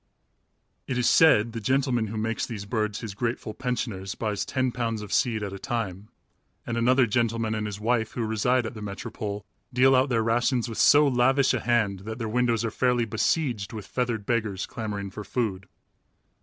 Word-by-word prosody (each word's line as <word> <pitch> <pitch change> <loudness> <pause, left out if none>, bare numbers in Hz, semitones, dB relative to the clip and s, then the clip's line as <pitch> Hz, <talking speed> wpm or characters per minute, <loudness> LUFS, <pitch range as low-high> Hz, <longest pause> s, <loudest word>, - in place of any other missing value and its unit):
It 130 - -2
is 125 - +2
said 115 -9 +5
the 115 - -5
gentleman 130 -1 +1
who 110 +2 -5
makes 110 +1 -1
these 105 -4 -6
birds 105 -1 -2
his 110 -4 -5
grateful 115 0 -3
pensioners 115 -7 -3
buys 105 -3 -2
ten 130 -2 0
pounds 115 -3 -2
of 105 - -6
seed 110 -4 +1
at 100 -1 -4
a 100 - -7
time, 110 -6 -4 0.6
and 115 - -3
another 125 +2 +4
gentleman 115 0 0
and 105 -1 -2
his 100 -1 -6
wife, 110 0 0
who 120 - -2
reside 120 +3 +1
at 110 - -5
the 110 - -9
Metropole, 105 0 -5 0.3
deal 130 +2 +5
out 130 +2 +3
their 115 -3 +1
rations 120 +2 +1
with 115 - -5
so 145 0 +6
lavish 130 +1 +3
a 130 - 0
hand 110 -5 +1
that 110 +3 -6
their 115 -2 -3
windows 115 0 +1
are 115 - -2
fairly 125 0 +1
besieged 115 0 -1
with 105 -3 -6
feathered 120 -5 -2
beggars 110 -5 -1
clamoring 100 -3 -5
for 105 +2 -7
food. 100 -5 -2
115 Hz, 190 wpm, -26 LUFS, 105-125 Hz, 0.6 s, so